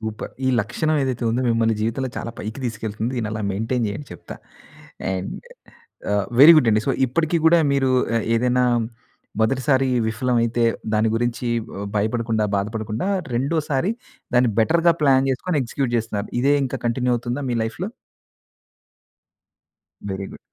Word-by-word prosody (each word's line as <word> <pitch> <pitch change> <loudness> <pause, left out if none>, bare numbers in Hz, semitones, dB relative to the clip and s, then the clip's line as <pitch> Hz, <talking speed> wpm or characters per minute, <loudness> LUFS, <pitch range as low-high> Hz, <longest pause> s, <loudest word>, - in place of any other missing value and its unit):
Super. 110 -1 -6
ఈ - - +3
లక్షణం 155 +9 -1
ఏదైతే 130 -3 -2
ఉందో 120 +3 0
మిమ్మల్ని 115 -1 +2
జీవితంలో 115 +4 -1
చాలా 115 - -4
పైకి 110 +5 -6
తీసుకెళ్తుంది. 110 0 -3
దీన్ని 110 -3 -2
అలా 110 - -3
మెయింటైన్ 115 +5 -1
చేయండి 105 +8 -6
చెప్తా. - - -10 0.8
అండ్ 95 0 -4 0.8
ఆహ్, 100 -1 +1
వెరీ 155 +4 +11
గుడ్ 125 -7 +4
అండి. 105 0 +3
సో - - +2 0.2
ఇప్పటికి 160 +6 0
గూడా 165 +1 +6
మీరు 135 -1 +2 0.3
ఆహ్, 115 - 0
ఏదైనా 125 +1 +2 0.8
మొదటిసారి 130 +3 +2 0.2
విఫలమైతే 115 +1 0 0.3
దాని 110 +1 +2
గురించి 120 +1 -1 0.3
ఆహ్, 100 - -4
భయపడకుండా, 110 +1 0
బాధపడకుండా 110 - -3 0.3
రెండోసారి 145 - 0 0.4
దాన్ని 125 -1 +4
బెటర్‌గా 170 +7 +3
ప్లాన్ 135 -1 +4
జేసుకొని 150 +4 -1
ఎగ్జిక్యూట్ 125 +1 -2
జేస్తున్నారు. 110 -2 -3
ఇదే 140 +3 +3
ఇంకా 130 - -3
కంటిన్యూ 125 +1 +1
అవుతుందా 120 +4 -4
మీ 120 - 0
లైఫ్‌లో? 175 - -4 2.2
Very 95 0 -4
good. - - -10
120 Hz, 140 wpm, -22 LUFS, 110-135 Hz, 2.2 s, వెరీ